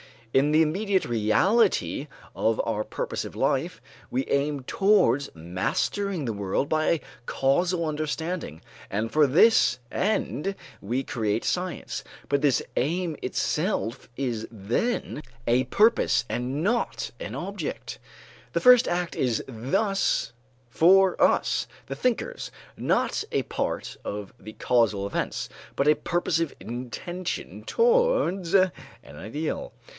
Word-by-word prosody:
In 140 +3 +4
the 155 +1 +5
immediate 190 +5 +1
reality 120 - +2 0.3
of - - +1
our - - -1
purposive - - -4
life - - 0 0.3
we 260 +2 -1
aim 140 0 0
towards 145 - +3
mastering 140 - -2
the 115 -4 -2
world 100 +7 -1
by 155 0 +1
a 165 - +2 0.2
causal 170 +8 +1
understanding, 155 - -3 0.3
and 110 +3 -2
for 150 -1 +4
this 155 - +5
end 195 -2 -1 0.2
we 120 +7 -2
create 110 -3 -1
science; 180 0 -2 0.3
but 140 0 +2
this 140 -5 +3
aim 165 +4 0
itself 135 - -1
is 120 -4 -2
then 120 - -2 0.2
a 125 +2 +3
purpose 130 - +3
and 130 +5 -2
not 235 +5 -1
an - - -5
object. - - -5 0.5
The - - 0
first 250 -1 +7
act 175 0 -1
is 120 -4 0
thus 135 - 0 0.4
for 185 +7 +5
us, - - +3 0.2
the - - -4
thinkers, 250 -2 -1 0.3
not - - +1
a - - +2
part - - -3
of 105 -1 -5
the 110 - -10
causal 110 -6 +1
events, 100 - -3 0.3
but 140 +2 +3
a 155 - +6
purposive 165 -2 -1
intention 130 +10 -5
towards 470 - +2
an 185 -1 +5 0.3
ideal. 110 - -5
150 Hz, 120 wpm, -26 LUFS, 120-190 Hz, 0.5 s, first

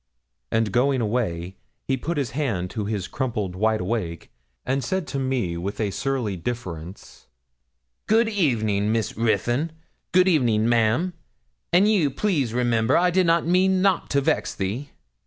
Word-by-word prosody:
And 110 -2 +1
going 130 +4 +2
away 105 -6 -2 0.3
he 135 - 0
put 160 +6 -3
his 135 -5 -1
hand 115 -11 -2
to 105 -3 -3
his 105 -3 -3
crumpled 110 -8 -3
wide 110 +2 +1
awake, 90 -5 -3 0.3
and 135 +1 0
said 190 -2 -1
to 135 - -2
me 125 -10 -1
with 95 +4 -4
a 105 -3 0
surly 125 -2 -2
difference 90 -4 -7 0.8
'Good 225 +2 +4
evening, 110 - +1
Miss 110 -1 -1
Ruthyn 120 - 0 0.4
good 185 +1 +5
evening, 120 - +3
ma'am 120 +10 +2 0.6
and 180 +4 +5
ye'll 195 -9 +3
please 140 - 0
remember, 115 -2 +2
I 180 +1 +3
did 185 0 +2
not 165 0 +3
mean 185 +2 +3
nout 195 -3 +2
to 140 - +2
vex 155 +2 0
thee.' 110 +9 -3
120 Hz, 155 wpm, -24 LUFS, 105-155 Hz, 0.8 s, good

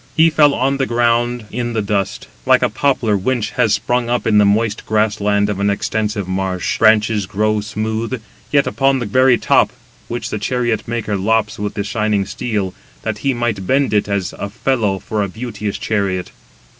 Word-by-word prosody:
He 165 +1 +6
fell 150 -2 +4
on 135 +2 +1
the 135 - 0
ground 120 0 +1
in 120 -1 -3
the 110 - 0
dust, 100 -1 -2 0.2
like - - +4
a - - +3
poplar, 130 -6 +1
winch 115 +3 -1
has 110 - +2
sprung 120 -1 -1
up 120 0 0
in 105 -2 +4
the 105 - +5
moist 105 +1 +1
grass 110 0 +1
land 100 0 +2
of 105 -2 -3
an 100 0 +2
extensive 105 -1 -1
marsh,—branches 100 +3 +1
grow 105 +2 0
smooth, 110 +3 -3 0.3
yet 140 -1 +4
upon 135 -1 +2
the 120 - -3
very 130 +3 +4
top, - - +3 0.4
which 120 +1 -4
the 105 - -2
chariot 120 0 -1
maker 115 -3 -2
lops 105 +2 0
with 105 0 -3
the 100 - -1
shining 105 -2 0
steel, 105 -6 -3 0.3
that 105 -1 -3
he 135 -2 0
might 110 -6 -2
bend 135 -4 +2
[it 105 -1 +2
as] 100 -2 -2
a 100 - -3
felloe 110 -3 0
for 105 +3 -3
a 100 - -1
beauteous 105 -1 -5
chariot. 100 -4 -1
110 Hz, 185 wpm, -18 LUFS, 100-120 Hz, 0.4 s, He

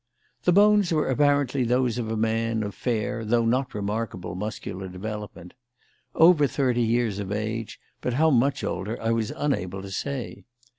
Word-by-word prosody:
The 180 - +5
bones 205 0 +5
were 155 -2 +1
apparently 140 -1 +2
those 125 0 +1
of 115 -2 -3
a 110 - -2
man 115 0 0
of 100 -1 -4
fair 120 0 -2
though 115 +1 +2
not 130 +2 0
remarkable 105 -3 -3
muscular 95 -1 -5
development; 100 -1 -7 0.6
over 160 -3 +6
thirty 125 -3 0
years 115 -3 +1
of 100 -1 -5
age, 110 +1 -3 0.2
but 125 - -1
how 160 +3 +4
much 135 +2 +2
older 100 +6 -3
I 115 - 0
was 115 -2 0
unable 95 -10 -2
to 100 - -8
say. 125 -4 -4
115 Hz, 160 wpm, -25 LUFS, 105-130 Hz, 0.6 s, over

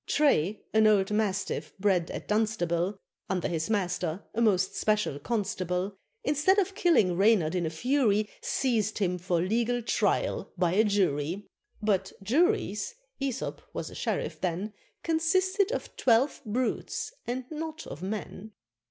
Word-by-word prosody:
Tray, 215 - +2
an 220 0 +5
old 205 -2 +3
Mastiff 210 -2 -1
bred 190 -4 +2
at - - -6
Dunstable, 205 -4 0 0.3
Under 185 -2 0
his 160 +1 -2
Master, 180 -4 -1
a 230 - -1
most 190 -5 +2
special 210 -9 +1
constable, 190 -1 -2 0.3
Instead 300 +7 +3
of 390 -1 +1
killing 265 - +3
Reynard 195 -4 +4
in 175 -3 0
a - - -1
fury, 215 - +2
Seized 220 -5 0
him 180 -3 0
for 175 -1 0
legal 235 +5 0
trial 230 - 0
by 175 -3 +2
a 210 +3 +5
Jury; 185 -3 0 0.4
But 195 -3 +1
Juries 330 - +1 0.3
Æsop 270 -2 -2
was - - -4
a - - -10
sheriff - - -2
then 185 +4 -2 0.3
Consisted 375 +5 +2
of - - -4
twelve 250 +3 +3
Brutes 250 - -2
and 250 +1 -2
not 315 +1 -5
of 150 - -8
Men. 205 +1 -5
210 Hz, 140 wpm, -28 LUFS, 185-250 Hz, 0.4 s, an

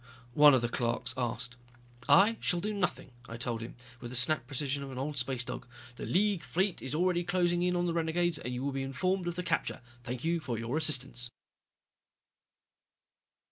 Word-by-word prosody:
one 145 +1 +8
of 130 - +2
the 120 - +1
clerks 120 +1 -1
asked. 125 0 -3 0.5
"I 215 +4 +6
shall 175 - 0
do 210 +4 -2
nothing," 185 -8 -2 0.2
I 115 - -6
told 120 -1 -3
him, 115 - -7 0.2
with 120 - -7
the 125 - -6
snapped 130 0 +3
precision 140 +1 -2
of 140 -1 -6
an 130 - -7
old 145 +3 -3
space 125 -1 0
dog. - - -6 0.3
"The - - -6
League 200 -1 +2
fleet 190 +1 -1
is 130 +3 -3
already 175 +1 +2
closing 175 -1 +1
in 180 0 +2
on 175 0 +1
the 170 - 0
renegades 170 +1 +1
and 125 - -4
you 125 +1 -3
will 140 - 0
be 135 0 -3
informed 175 +8 -1
of 175 - -2
the 180 - -3
capture. 175 - -1 0.2
Thank 125 +1 -5
you 170 +1 +1
for 125 -7 -3
your 115 +4 -3
assistance." 135 -6 +1
145 Hz, 195 wpm, -31 LUFS, 125-175 Hz, 0.5 s, one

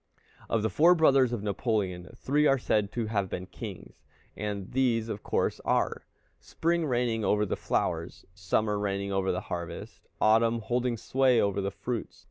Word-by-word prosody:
Of 110 -2 +1
the 110 - 0
four 170 - +5
brothers 135 -6 +4
of 115 -4 -3
Napoleon, 100 -4 -1
three 150 +2 +2
are 135 - +4
said 105 -5 0
to 120 -2 -1
have 100 -3 -1
been 90 +1 -4
kings, - - -9 0.3
and 105 -2 -4
these 120 -3 +1
of 105 - -4
course - - -1
are, - - 0 0.3
Spring 170 -1 -1
reigning 120 -3 0
over 105 +1 +2
the 95 - -2
flowers, - - -2
Summer 100 +4 0
reigning 100 -1 -2
over 95 -1 +1
the 90 - -2
harvest, 85 -4 -7
Autumn 115 +2 +4
holding 120 +1 -1
sway 130 +1 +2
over 100 0 +1
the 100 - -1
fruits. 105 +4 -5
110 Hz, 165 wpm, -28 LUFS, 100-125 Hz, 0.3 s, four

